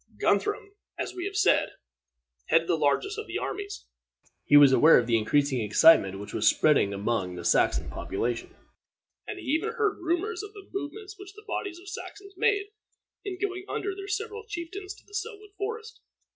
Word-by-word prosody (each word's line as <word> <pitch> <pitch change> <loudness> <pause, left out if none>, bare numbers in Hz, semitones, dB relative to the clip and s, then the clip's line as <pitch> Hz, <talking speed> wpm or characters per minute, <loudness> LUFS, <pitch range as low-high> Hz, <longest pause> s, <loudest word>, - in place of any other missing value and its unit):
Guthrum, 415 -1 0 0.3
as - - -4
we 360 - -5
have 400 0 -5
said, 425 - +3 0.7
headed 165 0 +3
the 175 - +2
largest 160 - 0
of 435 - -6
these - - -3
armies. 405 +1 -5 0.6
He 145 - +7
was 145 -2 +8
aware 150 +6 +7
of 120 - +2
the 115 -1 +1
increasing 130 +4 +1
excitement 105 -3 +5
that 100 - -8
was - - +2
spreading 145 -10 +3
among 100 -2 -2
the 90 -1 -8
Saxon - - +2
population, 115 +4 -4 0.7
and 420 - -5
he 370 - -9
even 315 +11 0
heard 430 -3 0
rumors 355 +3 -1
of 415 0 -10
the 405 -2 -13
movements 395 +4 -6
which 390 0 -11
the 425 0 -14
bodies 395 -4 -4
of 365 +3 -15
Saxons 400 0 -9
made, 405 +2 +1 0.5
in 395 -3 -5
going 375 -1 -3
under 400 - -2
their 395 0 -8
several 435 +2 -4
chieftains 380 +1 -6
to 410 - -21
Selwood 425 -1 -6
Forest. 445 +2 -6
385 Hz, 175 wpm, -27 LUFS, -, 0.7 s, was